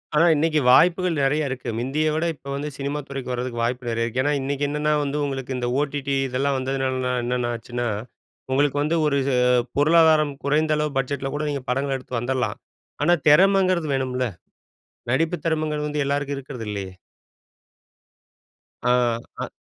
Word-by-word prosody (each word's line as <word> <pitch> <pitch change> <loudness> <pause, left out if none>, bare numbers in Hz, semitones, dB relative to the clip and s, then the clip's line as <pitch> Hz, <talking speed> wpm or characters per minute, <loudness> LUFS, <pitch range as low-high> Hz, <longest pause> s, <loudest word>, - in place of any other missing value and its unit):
ஆனா 165 +3 +5
இன்னைக்கு 155 +1 +2
வாய்ப்புகள் 180 +3 +4
நெறையா 145 +3 +1
இருக்கு. 125 -2 -5
முந்திய 150 +5 0
விட, 160 +2 0
இப்போ 140 - -16
வந்து 145 +2 -3
சினிமா 140 +1 -3
துறைக்கு 135 -2 -5
வரதுக்கு 125 -1 -3
வாய்ப்பு 125 +1 -2
நெறைய 115 0 0
இருக்கு. 120 +2 -1
ஏன்னா 145 - +1
இன்னைக்கு 140 +1 -2
என்னன்னா 150 +1 0
வந்து, 145 +1 -2
உங்களுக்கு 135 -2 -4
இந்த 120 -1 -2
OTT 145 -1 -3 0.2
இதெல்லாம் 135 +2 0
வந்ததுனால, 130 0 -1 0.3
என்னென்ன 120 0 -1
ஆச்சுன்னா, 120 +1 -4 0.6
உங்களுக்கு 145 +1 +2
வந்து 155 +3 0
ஒரு 140 -1 +1
ச 140 - +1 0.5
பொருளாதாரம் 155 -1 +4
குறைந்த 155 +2 +2
அளவு 150 -2 -2
பட்ஜெட்ல 135 +1 -2
கூட 150 +1 -2
நீங்க 140 -2 -2
படங்கள 135 +2 0
எடுத்து 125 -2 -4
வந்துரலாம். 120 -2 -1 0.5
ஆனா, 175 - +4 0.2
தெறமைங்கிறது 185 0 +4
வேணும்ல! 130 -1 -1 0.9
நடிப்பு 165 +6 +1
திறமைங்கிறது 155 -2 -1
வந்து 150 -1 -1
எல்லாருக்கும் 140 0 -1
இருக்கிறது 130 -4 -7
இல்லையே! 100 -2 -5 1.9
ஆ. - - 0 0.5
அ. - - -3
140 Hz, 155 wpm, -23 LUFS, 130-150 Hz, 1.9 s, ஆனா